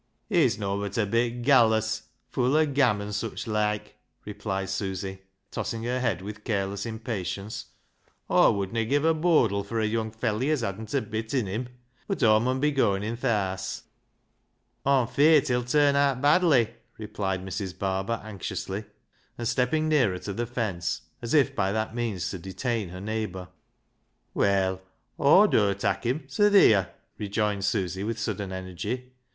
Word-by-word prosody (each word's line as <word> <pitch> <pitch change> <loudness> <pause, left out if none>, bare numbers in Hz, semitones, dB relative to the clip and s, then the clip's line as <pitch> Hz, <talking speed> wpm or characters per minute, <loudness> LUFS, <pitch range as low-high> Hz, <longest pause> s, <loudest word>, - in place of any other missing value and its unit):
" - - -46
He's - - +3
nobbut 100 0 -3
a 110 - +2
bit 120 +3 0
gallus, 110 -4 +4 0.3
full 130 +2 +1
o' 155 0 +5
gam 135 -8 +2
an' 105 0 -6
sich 110 +2 -3
loike," 105 -1 -1 0.3
replied 95 -2 -4
Susy, 95 -1 -4 0.3
tossing 115 -1 -3
her 125 +2 -1
head 105 -8 -1
with 105 +1 -8
careless 100 -1 -2
impatience. 110 -3 -4 0.3
" - - -40
Aw - - +6
wouldna 100 +3 -1
give 145 +6 +1
a 165 - +5
bodle 155 - +2
fur 115 +3 -3
a 110 - +1
young 110 +1 -1
felley 110 +3 -1
as 155 -4 +1
hadn't 110 +4 -4
a 135 - +2
d/t 110 +3 -3
In - - -4
him; 110 +6 -4 0.4
but 195 -9 -2
Aw 110 -1 +6
mun 130 +3 0
be 150 +2 +2
goin' 105 -8 +1
i' 110 +2 -2
th' 120 - -9
haase." 95 -6 -1 0.5
" - - -47
Aw'm 135 -3 +4
feart 150 +4 +4
he'll 125 0 +1
turn 145 +3 +3
aat 140 -2 +2
badly," 145 -5 +4 0.2
replied 100 -4 -3
Mrs. 95 -1 -5
Barber 95 +4 -1
anxiously, 100 0 -5 0.5
and 120 - -3
stepping 130 +6 +1
nearer 130 -12 +2
to 100 +2 -5
the 120 +4 -3
fence, 100 -8 -2 0.2
as 120 +4 -1
if 145 -5 +3
by 95 -1 +1
that 110 +1 -2
means 110 -7 -2
to 95 - -5
detain 100 +3 -3
her 90 +1 -8
neigh 110 +2 -2
bour. 90 -1 -9 0.8
"Well, 95 -1 +1 0.4
^wdur 140 - +5
tak' 100 - -1
him; 135 +5 -1
so 205 +10 +3
theer," 105 - +5 0.3
rejoined 105 -1 -1
Susy 95 -3 -1
with 115 +2 -2
sudden 105 -3 -3
energy. 95 +8 -5
110 Hz, 170 wpm, -27 LUFS, 100-125 Hz, 0.8 s, Aw